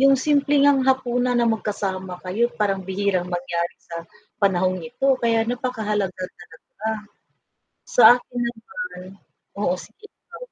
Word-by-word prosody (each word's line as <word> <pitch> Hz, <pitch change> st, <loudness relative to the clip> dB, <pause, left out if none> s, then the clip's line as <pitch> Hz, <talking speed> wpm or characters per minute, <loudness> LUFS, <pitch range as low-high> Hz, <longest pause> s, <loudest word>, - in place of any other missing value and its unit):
yung 275 Hz, 0 st, +6 dB
simpleng 285 Hz, 0 st, +3 dB
ngang 275 Hz, -2 st, +4 dB
hapunan 250 Hz, -1 st, +1 dB
na 240 Hz, -, +3 dB
magkasama 195 Hz, -4 st, -2 dB
kayo 220 Hz, +6 st, +1 dB
parang 195 Hz, -2 st, +1 dB
bihirang 190 Hz, -2 st, -1 dB
mangyari 175 Hz, -1 st, -2 dB
sa, 170 Hz, 0 st, -8 dB, 0.4 s
panahong 185 Hz, -1 st, +2 dB
ito, 270 Hz, +11 st, +1 dB
kaya 230 Hz, -1 st, +2 dB
napakahalaga 220 Hz, -6 st, -1 dB, 0.2 s
talaga. 165 Hz, -, -16 dB, 1.3 s
Sa -, -, +3 dB, 0.2 s
akin 245 Hz, -, -9 dB
naman, 245 Hz, -, -7 dB, 0.6 s
oo 180 Hz, -, +2 dB
sige 245 Hz, -, -14 dB, 0.2 s
lang. -, -, -10 dB
220 Hz, 125 wpm, -23 LUFS, 185-260 Hz, 1.3 s, yung